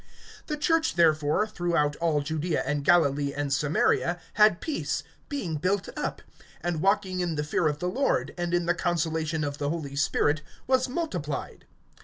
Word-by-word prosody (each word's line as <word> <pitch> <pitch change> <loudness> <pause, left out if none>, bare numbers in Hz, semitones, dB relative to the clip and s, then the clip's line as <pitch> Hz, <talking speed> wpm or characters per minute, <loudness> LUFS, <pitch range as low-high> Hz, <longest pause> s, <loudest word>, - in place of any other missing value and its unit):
(31)The 300 -1 -3
church 325 +1 +2
therefore, 155 +2 +3
throughout 170 -7 0
all 160 -3 +1
Judaea 155 +3 -1
and 145 +1 -1
Galilee 145 -3 +3
and 145 -1 -1
Samaria, 155 +4 +1
had 210 -4 +5
peace, 310 - -2 0.3
being 195 - -2
built 185 +5 0
up, - - -3 0.4
and 170 -3 -2
walking 195 -1 +1
in 175 -3 -1
the 150 - -1
fear 155 +2 +1
of 150 -1 0
the 180 - -3
Lord, 265 +9 0
and 175 -1 -2
in 175 -1 +1
the 175 - +3
consolation 160 -3 -1
of 145 0 -3
the 145 -1 -1
Holy 150 -4 -4
Spirit, 145 +2 +1 0.2
was 260 0 +2
multiplied. 180 - -4
170 Hz, 165 wpm, -27 LUFS, 150-185 Hz, 0.4 s, had